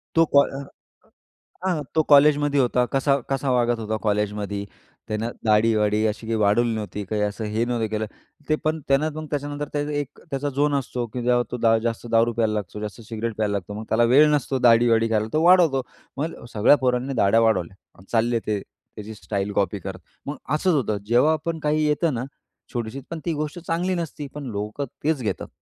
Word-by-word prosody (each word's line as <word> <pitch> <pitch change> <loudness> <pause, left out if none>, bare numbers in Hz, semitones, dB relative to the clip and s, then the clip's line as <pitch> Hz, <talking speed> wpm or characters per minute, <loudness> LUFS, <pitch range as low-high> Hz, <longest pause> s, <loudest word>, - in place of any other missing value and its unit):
तो 165 0 +6
का - - +10 0.2
अ, 140 - -8 1.0
हां. 165 -5 0
तो 160 - +4
कॉलेजमध्ये 145 0 +5
होता, 125 0 +2
कसा 135 +1 +3
कसा 135 0 0
वागत 120 -2 +2
होता 110 0 -2
कॉलेजमध्ये. 105 -1 -1 0.4
त्यानं 110 +2 -2 0.2
दाढीवाडी 105 -1 +3
अशी 110 +1 -4
काही 115 - 0
वाढवली 110 +3 +3
नव्हती, 105 -1 -5
काही 105 +2 -2
असं 105 +2 -3
हे 110 +2 -1
नव्हतं 120 -2 -1
केलं. 110 0 -2 0.4
ते 155 - +4
पण 155 +1 +1
त्यानं 140 +3 +2
मग 155 0 -5
त्याच्यानंतर 145 0 -3
ते 145 - +1 0.2
एक 145 0 -7
त्याचा 140 +1 -1
झोन 145 +2 +1
असतो, 125 -3 -2
की 120 +3 -5 0.3
तो 125 - -3 0.3
जास्त 115 0 -2
दारू 115 +1 +3
प्यायला 110 -1 +1
लागतो, 105 -1 -4
जास्त 105 +2 -6
सिगरेट 115 0 -4
प्यायला 105 -2 0
लागतो. 100 0 -4
मग 110 - -6
त्याला 115 +2 +3
वेळ 150 +3 +7
नसतो 140 -2 0
दाढीवाढी 115 -1 +4
करायला, 110 -1 +1
तो 155 +1 +2
वाढवतो. 170 -7 +5 0.4
मग 155 -1 -4
सगळ्या 110 +6 +5
पोरांनी 125 +2 0
दाढया 115 -2 +3
वाढवल्या 95 -4 -2
चालले, 115 0 +2
ते 105 -1 0
त्याची 110 +1 -12
स्टाईल 100 -1 -3
कॉपी 100 0 0
करत. - - -7 0.3
मग 145 0 -4
असंच 160 +4 +2
होतं, 110 -7 0
जेव्हा 125 +8 +4
आपण 160 +1 -3
काही 155 0 +1
येतं 150 +1 +1
ना, 120 +2 -3 0.5
छोटीशी 120 +2 -4
पण 165 - -4
ती 170 - 0
गोष्ट 155 +3 -4
चांगली 175 +2 -1
नसती, 160 -4 -5
पण 150 - -6
लोकं 105 +7 -3 0.2
तेच 150 -2 +1
घेतात. 110 - -3
120 Hz, 185 wpm, -23 LUFS, 110-145 Hz, 1.0 s, का